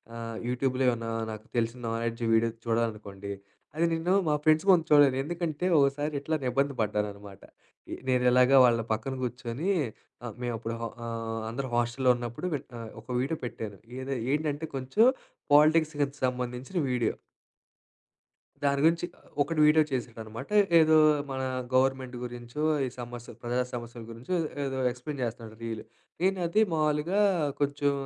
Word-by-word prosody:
ఆహ్, 115 Hz, -1 st, -5 dB
యూట్యూబ్‌లో 130 Hz, +1 st, 0 dB
ఏమన్నా 115 Hz, -1 st, -2 dB, 0.2 s
నాకు 110 Hz, 0 st, -8 dB
తెలిసిన 115 Hz, +1 st, 0 dB
నాలెడ్జ్ 115 Hz, +1 st, -2 dB
వీడియో 115 Hz, +1 st, +2 dB
చూడాలనుకోండి 105 Hz, -4 st, -2 dB, 0.4 s
అది 165 Hz, +2 st, +2 dB
నేను 165 Hz, +3 st, +1 dB
మా 150 Hz, -, +3 dB
ఫ్రెండ్స్ 155 Hz, +2 st, +4 dB
కోసం 180 Hz, -3 st, +7 dB
చూడను. 145 Hz, -3 st, +6 dB
ఎందుకంటే 170 Hz, +1 st, -3 dB
ఒకసారి 145 Hz, +2 st, +2 dB
ఇట్లానే 145 Hz, -1 st, -2 dB
ఇబ్బంది 140 Hz, +3 st, +1 dB
పడ్డాననమాట. 105 Hz, -2 st, -3 dB, 0.5 s
ఇ -, -, -3 dB, 0.2 s
నేను 125 Hz, -1 st, +3 dB
ఎలాగా 125 Hz, +2 st, +6 dB
వాళ్ళ 120 Hz, -1 st, +3 dB
పక్కన 130 Hz, +5 st, -3 dB
కూర్చొనీ 120 Hz, -, -3 dB, 0.6 s
ఆహ్, 115 Hz, -, -5 dB
మేము 120 Hz, -1 st, -1 dB
అప్పుడు 115 Hz, +1 st, -4 dB
హ -, -, -3 dB, 0.2 s
ఆహ్, 115 Hz, -1 st, -4 dB
అందరూ 130 Hz, +3 st, -4 dB
హాస్టల్లో 120 Hz, +2 st, +2 dB
ఉన్నప్పుడు 120 Hz, +8 st, -5 dB
వెట్ 140 Hz, 0 st, -6 dB
నా 115 Hz, -, -6 dB, 0.2 s
ఒక 110 Hz, -, -26 dB
వీడియో 145 Hz, +5 st, -2 dB
పెట్టారు. 105 Hz, -4 st, -6 dB, 0.2 s
ఏది 130 Hz, 0 st, -3 dB, 0.2 s
ఏంటంటే 150 Hz, +1 st, -1 dB
కొంచెం 135 Hz, -, +3 dB, 0.5 s
పాలిటిక్స్కిది 150 Hz, -2 st, +4 dB
సంబంధించిన 125 Hz, +5 st, -3 dB
వీడియో. 125 Hz, -2 st, +1 dB, 1.5 s
దాని 140 Hz, 0 st, +2 dB
గురించి, 170 Hz, +2 st, +3 dB, 0.4 s
ఒకడు 155 Hz, +2 st, -1 dB
వీడియో 155 Hz, +1 st, +5 dB
చేసాడనమాట. 115 Hz, -1 st, -5 dB, 0.3 s
ఏదో 160 Hz, 0 st, +6 dB, 0.3 s
మన 130 Hz, 0 st, -3 dB, 0.3 s
గవర్నమెంట్ 130 Hz, -1 st, +1 dB
గురించో, 120 Hz, +4 st, -6 dB, 0.2 s
ఈ -, -, -2 dB
సమస్య 120 Hz, 0 st, -8 dB
ప్రజా 120 Hz, +1 st, 0 dB
సమస్యలు 120 Hz, -1 st, -7 dB
గురించో, 125 Hz, +11 st, -3 dB, 0.3 s
ఏదో 135 Hz, -1 st, -3 dB
ఎక్స్‌ప్లేన్ 130 Hz, +3 st, -7 dB
చేస్తన్నాడు 115 Hz, -1 st, -6 dB
రీల్. 115 Hz, -1 st, -4 dB, 0.4 s
నేనది 185 Hz, +1 st, +2 dB
మావులుగా, 155 Hz, +5 st, +1 dB, 0.4 s
కొంచెం 145 Hz, 0 st, +1 dB
130 Hz, 140 wpm, -28 LUFS, 115-150 Hz, 1.5 s, కోసం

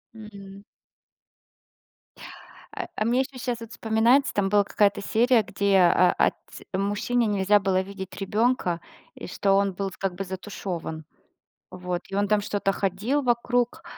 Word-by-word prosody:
М. 200 Hz, -2 st, -11 dB, 2.1 s
А -, -, -4 dB
а 215 Hz, -, -1 dB
мне 245 Hz, +3 st, +2 dB
еще 265 Hz, 0 st, -6 dB
щас 245 Hz, -2 st, -2 dB
вот 230 Hz, 0 st, -9 dB
вспоминается, 230 Hz, +5 st, +2 dB
там 195 Hz, -1 st, 0 dB
была 205 Hz, 0 st, +4 dB
какая-то 200 Hz, 0 st, +1 dB
серия, 235 Hz, +4 st, +3 dB
где, 200 Hz, 0 st, +1 dB
а, 180 Hz, 0 st, +5 dB
а, -, -, +4 dB
отц -, -, -7 dB
мужчине 205 Hz, +5 st, 0 dB
нельзя 205 Hz, 0 st, +3 dB
было 190 Hz, -1 st, +1 dB
видеть 190 Hz, -1 st, -8 dB
ребенка, 205 Hz, -3 st, 0 dB, 0.4 s
и -, -, -9 dB
что 195 Hz, +2 st, 0 dB
он 200 Hz, 0 st, +2 dB
был 195 Hz, +1 st, -4 dB
как 195 Hz, -2 st, -2 dB
бы 195 Hz, -, -4 dB
затушёван, 185 Hz, -4 st, -6 dB, 0.7 s
Вот, 180 Hz, -1 st, -4 dB
и 195 Hz, -, -8 dB
он 200 Hz, +1 st, +1 dB
там 210 Hz, 0 st, +3 dB
что-то 205 Hz, -1 st, -1 dB
ходил 205 Hz, +10 st, -1 dB
вокруг, 245 Hz, +4 st, 0 dB
200 Hz, 150 wpm, -25 LUFS, 190-225 Hz, 2.1 s, а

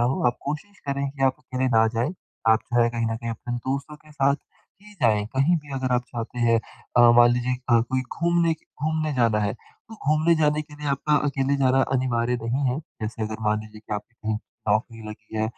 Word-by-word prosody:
हो -, -, -2 dB
आप 120 Hz, 0 st, +2 dB
कोशिश 155 Hz, +8 st, -5 dB
करें 140 Hz, 0 st, -1 dB
कि 135 Hz, -1 st, -6 dB
आप 130 Hz, -1 st, +3 dB
अकेले 130 Hz, 0 st, -2 dB
ना 110 Hz, 0 st, +6 dB
जाएँ। 120 Hz, +10 st, 0 dB, 0.3 s
आप 110 Hz, +1 st, +5 dB
जो 120 Hz, 0 st, +5 dB
है 115 Hz, -, +3 dB
कहीं 115 Hz, -1 st, -1 dB
न 115 Hz, 0 st, -1 dB
कहीं 115 Hz, 0 st, -5 dB
अपने 120 Hz, +2 st, -5 dB
दोस्तों 140 Hz, +4 st, -4 dB
के 155 Hz, 0 st, -20 dB
साथ 140 Hz, -1 st, +3 dB, 0.5 s
ही 210 Hz, 0 st, -15 dB
जाएँ 105 Hz, -3 st, +3 dB
कहीं 160 Hz, +6 st, +4 dB
भी 145 Hz, -2 st, -8 dB
अगर 130 Hz, -1 st, -1 dB
आप 125 Hz, -, +1 dB
जाते 120 Hz, +1 st, -5 dB
हैं। 115 Hz, -1 st, +4 dB, 0.4 s
अ, -, -, +7 dB, 0.2 s
मान 120 Hz, 0 st, +8 dB
लीजिए 125 Hz, +1 st, 0 dB
अ, 120 Hz, -1 st, +5 dB
कोई 130 Hz, +3 st, -1 dB, 0.2 s
घूमने 170 Hz, -1 st, +2 dB
के 160 Hz, -, -28 dB, 0.2 s
घूमने 155 Hz, -1 st, 0 dB
जाना 115 Hz, -4 st, +3 dB
है, 105 Hz, -1 st, 0 dB
तो 225 Hz, -, -17 dB
घूमने 155 Hz, -1 st, +2 dB
जाने 150 Hz, 0 st, +2 dB
के 150 Hz, -1 st, -14 dB
लिए 150 Hz, 0 st, -5 dB
आपका 140 Hz, +2 st, +1 dB
अकेले 140 Hz, 0 st, 0 dB
जाना 135 Hz, -1 st, +3 dB, 0.2 s
अनिवार्य 125 Hz, -1 st, 0 dB
नहीं 125 Hz, +5 st, -1 dB
है। 135 Hz, -, -2 dB, 0.2 s
जैसे 110 Hz, +1 st, -4 dB
अगर 110 Hz, +1 st, -4 dB
मान 105 Hz, 0 st, +2 dB
लीजिए 110 Hz, 0 st, -12 dB
कि 105 Hz, -1 st, -5 dB
आपकी 105 Hz, +3 st, -7 dB
कहीं 110 Hz, -2 st, -3 dB, 0.3 s
नौकरी 110 Hz, +2 st, 0 dB
लगी 110 Hz, +1 st, -9 dB
है 110 Hz, -, +1 dB
125 Hz, 225 wpm, -25 LUFS, 115-145 Hz, 0.5 s, मान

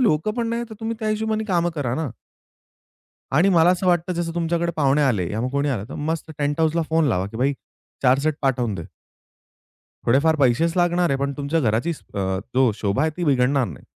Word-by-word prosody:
लोक 185 Hz, -7 st, +2 dB
पण 235 Hz, -1 st, 0 dB
नाहीतर 235 Hz, -1 st, -3 dB
तुम्ही 225 Hz, +1 st, -3 dB
त्या 215 Hz, -, -1 dB
हिशोबाने 220 Hz, 0 st, -1 dB
काम 175 Hz, -4 st, +1 dB
करा 130 Hz, -5 st, -2 dB
ना. 155 Hz, +1 st, -2 dB, 1.2 s
आणि 165 Hz, +8 st, +4 dB
मला 165 Hz, +1 st, +6 dB
असं 185 Hz, +1 st, 0 dB
वाटतं, 175 Hz, 0 st, +2 dB
जसं 170 Hz, -1 st, -3 dB
तुमच्याकडे 170 Hz, 0 st, 0 dB
पाहुणे 145 Hz, -1 st, +3 dB
आले 105 Hz, -11 st, +1 dB
या 110 Hz, -, -2 dB
मग 125 Hz, -, -1 dB
कोणी 140 Hz, +2 st, 0 dB
आलं, 115 Hz, -7 st, -2 dB
तर -, -, -8 dB
मस्त 160 Hz, +1 st, -3 dB
टेंट 145 Hz, +1 st, -1 dB
हाउसला 160 Hz, +1 st, +2 dB
फोन 160 Hz, 0 st, +2 dB
लावा, 95 Hz, -5 st, 0 dB
की 100 Hz, -, -9 dB
भाई, 135 Hz, +4 st, +1 dB, 0.5 s
4 130 Hz, 0 st, +4 dB
सेट 155 Hz, +2 st, 0 dB
पाठवून 125 Hz, -6 st, 0 dB
दे. 85 Hz, -, -6 dB, 1.2 s
थोडेफार 140 Hz, +7 st, +3 dB
पैसेच 145 Hz, +4 st, +2 dB
लागणार 175 Hz, 0 st, +2 dB
आहे, 135 Hz, -, +1 dB
पण 140 Hz, 0 st, -1 dB
तुमच्या 145 Hz, +3 st, 0 dB
घराची 115 Hz, +5 st, +1 dB, 0.2 s
अ, -, -, -3 dB, 0.4 s
जो 130 Hz, -2 st, +4 dB
शोभा 105 Hz, +5 st, -1 dB
आहे, 160 Hz, -, +2 dB
ती 175 Hz, -, -2 dB
बिघडणार 135 Hz, -2 st, +2 dB
नाही. 75 Hz, -10 st, -10 dB
150 Hz, 200 wpm, -22 LUFS, 130-170 Hz, 1.2 s, मला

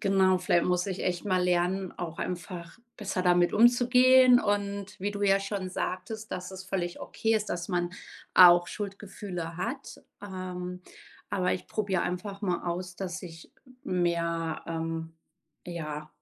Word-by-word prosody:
Genau, 190 Hz, -2 st, +3 dB
vielleicht 175 Hz, -1 st, +2 dB
muss 180 Hz, +1 st, +1 dB
ich 190 Hz, -1 st, -3 dB
echt 180 Hz, +1 st, -1 dB
mal 185 Hz, -2 st, +2 dB
lernen, 180 Hz, +1 st, +1 dB
auch 165 Hz, -2 st, -5 dB
einfach 175 Hz, -1 st, -5 dB, 0.2 s
besser 200 Hz, -3 st, -2 dB
damit 175 Hz, -1 st, +3 dB
umzugehen 250 Hz, +2 st, +6 dB
und 200 Hz, -1 st, -2 dB
wie 205 Hz, +2 st, -1 dB
du 205 Hz, 0 st, -5 dB
ja 195 Hz, 0 st, +4 dB
schon 195 Hz, -1 st, -3 dB
sagtest, 210 Hz, +4 st, -4 dB
dass 180 Hz, +1 st, -5 dB
es 190 Hz, 0 st, -7 dB
völlig 185 Hz, -2 st, -3 dB
okay 225 Hz, 0 st, -1 dB
ist, 215 Hz, -1 st, 0 dB
dass 175 Hz, 0 st, -3 dB
man 175 Hz, -2 st, 0 dB, 0.4 s
auch 175 Hz, -1 st, +8 dB
Schuldgefühle 195 Hz, -4 st, -6 dB
hat. 240 Hz, +9 st, -5 dB, 0.2 s
Ähm. 180 Hz, -2 st, -6 dB, 0.5 s
Aber 185 Hz, -3 st, +1 dB
ich -, -, -4 dB
probiere 200 Hz, -3 st, -1 dB
einfach 195 Hz, +3 st, -4 dB
mal 180 Hz, -4 st, -1 dB
aus, 180 Hz, +1 st, -3 dB
dass 185 Hz, -1 st, -4 dB
ich 165 Hz, -2 st, -11 dB, 0.3 s
mehr, 170 Hz, -2 st, -1 dB
ähm 165 Hz, 0 st, -3 dB, 0.5 s
ja, 155 Hz, -3 st, -5 dB
185 Hz, 150 wpm, -28 LUFS, 175-200 Hz, 0.5 s, auch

